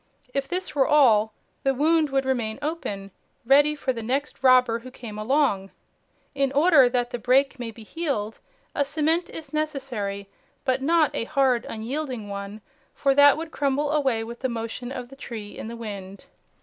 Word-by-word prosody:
If 275 0 -1
this 365 +1 -3
were 275 -3 +3
all, 230 -8 +5 0.3
the 270 0 +1
wound 310 +2 +3
would 270 -1 0
remain 235 -5 -1
open, 205 -11 -4 0.3
ready 290 +4 +5
for 270 -3 -1
the 230 - -5
next 270 +5 -2
robber 255 -3 +5
who 255 +2 -10
came 225 -4 -9
along. 215 -5 +1 0.6
In 275 -1 0
order 290 -3 +6
that 245 -1 -1
the 245 - -4
break 265 +3 +2
may 240 -2 -4
be 225 0 -11
healed, 225 -6 -3 0.3
a 285 - +1
cement 310 +4 0
is 310 -3 -9
necessary, 260 -10 -3 0.4
but 260 0 +1
not 315 +1 +3
a - - -2
hard, 255 -2 +1
unyielding 245 -1 -4
one, 200 +1 -6 0.3
for 275 -1 +2
that 285 +1 +7
would 320 0 -6
crumble 285 0 0
away 265 -7 +1
with 235 +1 -8
the 260 - -1
motion 235 +2 -5
of 250 -2 -6
the 270 - -12
tree 220 -6 -8
in - - -7
the 235 +1 -7
wind. 200 -4 -8
260 Hz, 175 wpm, -25 LUFS, 225-285 Hz, 0.6 s, that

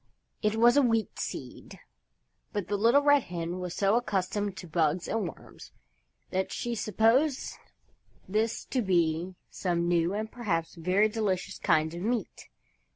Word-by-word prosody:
It 210 0 +1
was 240 +3 +5
a - - +7
Wheat 225 -4 0
Seed, - - -7 0.7
but 205 -4 -2
the 205 - +1
Little 235 +8 +4
Red 290 -1 +5
Hen 175 +1 -4
was 180 -1 -5
so 200 +1 +2
accustomed 205 -3 -1
to 180 - -8
bugs 160 +1 0
and 220 -5 -1
worms - - -13 0.6
that 190 +1 -1
she 240 - -3
supposed 230 +7 +2 0.7
this 215 +4 -1
to 255 - +1
be 175 -2 +1 0.2
some 170 -2 -1
new 175 +2 +1
and 220 +1 -3
perhaps 175 -9 -2
very 185 +5 +2
delicious 210 -4 -2
kind 155 +1 +2
of 170 - -6
meat. 230 +3 -3
200 Hz, 150 wpm, -29 LUFS, 175-225 Hz, 0.7 s, a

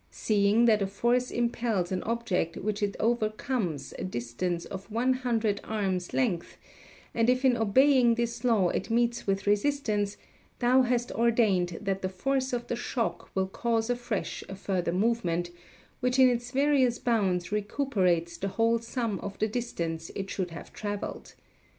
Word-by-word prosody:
Seeing 210 +2 +2
that 215 -3 +4
a 195 - +1
force 240 +5 +1
impels 235 -6 -1
an 185 -1 -1
object 220 -8 -1
which 210 +1 -2
it 205 -1 0
overcomes 215 - -1
a - - -3
distance 170 +4 -3
of 195 +2 -8
one 240 +4 +2
hundred 230 -5 0
arms' 190 -4 -2
length, 200 -10 -1 0.6
and 230 +1 +2
if 255 +1 +2
in 255 -2 +5
obeying 240 +2 +4
this 235 0 -2
law 220 -7 +3
it 185 - -2
meets 235 0 +1
with 195 0 0
resistance, 210 -2 +1 0.4
thou 255 +2 +4
hast 245 -1 0
ordained 210 -7 +2
that 195 -2 -2
the 185 - -1
force 260 +8 -1
of 240 -1 -2
the - - -2
shock 230 -7 -3
will 190 0 +1
cause 230 +3 0
afresh 240 -4 -3
a 195 - -5
further 185 -3 -1
movement, 180 -4 0 0.5
which 250 0 0
in 260 -1 +7
its 240 0 -2
various 265 -2 +3
bounds 195 -7 0
recuperates 195 -6 0
the 195 - -2
whole 230 +3 +2
sum 230 -3 -3
of 200 - -6
the 215 - +1
distance 170 -8 -3
it 195 -1 -4
should 185 -2 -2
have 165 - -10
travelled. 205 -1 -5
220 Hz, 160 wpm, -28 LUFS, 190-240 Hz, 0.6 s, in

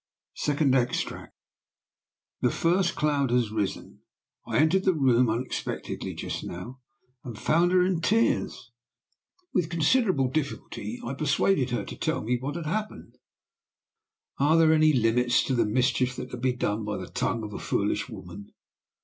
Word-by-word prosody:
SECOND 145 -2 +1
EXTRACT. 125 -2 -1 1.1
"The - - +3
first 170 +1 +1
cloud 145 -3 +1
has 120 -3 +1
risen. 105 -3 -3 0.5
I - - -1
entered 160 +5 +3
the 190 -3 +2
room 125 -4 +3
unexpectedly 120 +4 -4
just - - -5
now, 120 +10 -7 0.4
and 120 -5 -7
found 170 +9 +2
her 180 -1 +4
in 180 -3 0
tears. 225 +7 0 0.8
"With 175 -3 +1
considerable 170 - +2
difficulty 125 -5 -4
I 125 - -3
persuaded 140 0 +1
her 120 - -2
to - - -8
tell - - -2
me 120 +2 0
what 140 +4 -4
had 170 -2 -5
happened. 215 +7 -4 1.2
Are 150 +4 +4
there 160 -1 +5
any 155 0 +5
limits 120 -1 +2
to 135 - -1
the 120 -4 +2
mischief 125 +2 +1
that 125 - -7
can 125 - -6
be 130 +1 +1
done 110 -3 -2
by 105 -1 -3
the 95 - -6
tongue 115 +1 -2
of 105 -1 -6
a - - -5
foolish - - -1
woman? 100 +3 -10
130 Hz, 155 wpm, -27 LUFS, 120-160 Hz, 1.2 s, there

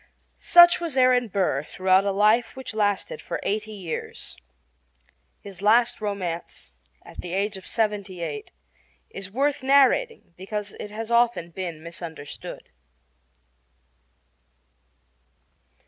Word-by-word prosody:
Such 345 +1 +7
was 330 -6 -4
Aaron 255 -1 +4
Burr 185 -8 0
throughout 185 +4 +2
a 200 - +1
life 215 +4 +2
which 260 -2 -7
lasted 215 - -1
for - - -4
eighty 215 +1 -2
years. 185 -6 -6 1.1
His 195 -2 -11
last 230 +3 +3
romance, 185 -5 -5 0.3
at - - -10
the 175 -1 -7
age 200 +1 -1
of 190 - -10
seventy 205 -5 -2
eight, 430 - -5 0.6
is 195 - -7
worth 280 +6 0
narrating 280 - +3
because 205 +2 -5
it 210 - -6
has 220 +2 -6
often 235 -8 +2
been 170 -3 -6
misunderstood. 165 -3 -9
210 Hz, 115 wpm, -25 LUFS, 185-245 Hz, 1.1 s, Such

